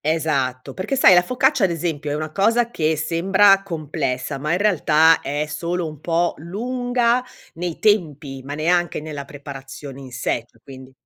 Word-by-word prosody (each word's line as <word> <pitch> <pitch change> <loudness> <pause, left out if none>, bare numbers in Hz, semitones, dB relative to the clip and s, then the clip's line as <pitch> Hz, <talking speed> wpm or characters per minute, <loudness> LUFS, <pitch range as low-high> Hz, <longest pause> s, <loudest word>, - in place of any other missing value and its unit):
Esatto, 140 -5 -1
perché, 185 - -3
sai, 230 -7 +7
la 180 - +7
focaccia, 250 +4 +1
ad - - 0
esempio, 160 -3 -3
è 145 - -1
una 155 0 -4
cosa 230 +6 +2
che 160 -6 0
sembra 190 +5 +4
complessa, 150 -8 -3
ma 150 +2 -2
in 170 - +2
realtà 165 -5 +4
è 145 +2 -2
solo 170 +3 -3
un 155 -2 -9
po' 170 +1 +1
lunga 245 - 0 0.3
nei 170 0 -4
tempi, 150 -10 0
ma 140 +2 -6
neanche 175 +2 +1
nella 150 -2 -7
preparazione 140 -1 -9
in 130 -2 -11
sé, 120 -1 -2
cioè 115 - -27
quindi 130 -1 -12
160 Hz, 170 wpm, -21 LUFS, 145-190 Hz, 0.3 s, sai